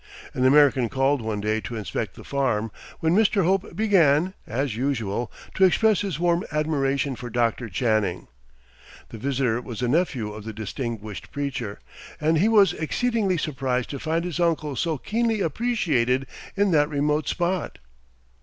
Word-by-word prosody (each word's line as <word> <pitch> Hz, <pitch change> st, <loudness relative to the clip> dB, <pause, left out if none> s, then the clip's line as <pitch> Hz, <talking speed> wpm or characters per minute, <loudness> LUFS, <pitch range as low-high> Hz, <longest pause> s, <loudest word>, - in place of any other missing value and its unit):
An 130 Hz, -, 0 dB
American 135 Hz, -3 st, +5 dB
called 135 Hz, 0 st, +1 dB
one 110 Hz, -2 st, -3 dB
day 110 Hz, +1 st, 0 dB
to 120 Hz, -, -6 dB
inspect 110 Hz, -3 st, -4 dB
the -, -, -11 dB
farm, 120 Hz, -6 st, -1 dB, 0.3 s
when 160 Hz, +2 st, +2 dB
Mr. 205 Hz, -2 st, +3 dB
Hope 190 Hz, +3 st, 0 dB
began, 185 Hz, -5 st, +3 dB
as 130 Hz, 0 st, -2 dB
usual, 120 Hz, -3 st, -2 dB, 0.2 s
to 190 Hz, -, +2 dB
express 210 Hz, +2 st, +4 dB
his 190 Hz, -7 st, -3 dB
warm 175 Hz, 0 st, +2 dB
admiration 140 Hz, -3 st, 0 dB
for 120 Hz, 0 st, -7 dB
Dr. 120 Hz, 0 st, 0 dB
Channing. 105 Hz, -3 st, 0 dB, 0.8 s
The 115 Hz, -, -9 dB
visitor 125 Hz, -2 st, 0 dB
was 120 Hz, -1 st, -6 dB
a -, -, +2 dB
nephew 130 Hz, -7 st, 0 dB
of 105 Hz, 0 st, -8 dB
the 110 Hz, +1 st, -6 dB
distinguished 110 Hz, -1 st, -5 dB
preacher, 135 Hz, -7 st, -4 dB, 0.4 s
and 160 Hz, +1 st, +2 dB
he 200 Hz, -, +4 dB
was 210 Hz, -3 st, +5 dB
exceedingly 205 Hz, -, 0 dB
surprised 130 Hz, -5 st, -2 dB
to 140 Hz, -, -5 dB
find 165 Hz, +3 st, -1 dB
his 180 Hz, -1 st, -4 dB
uncle 160 Hz, -4 st, 0 dB
so 160 Hz, +2 st, -1 dB
keenly 225 Hz, -, 0 dB
appreciated 155 Hz, -, +1 dB, 0.3 s
in 200 Hz, -1 st, +3 dB
that 150 Hz, -2 st, +3 dB
remote 150 Hz, 0 st, 0 dB
spot. 180 Hz, +1 st, -1 dB
140 Hz, 155 wpm, -24 LUFS, 120-175 Hz, 0.8 s, American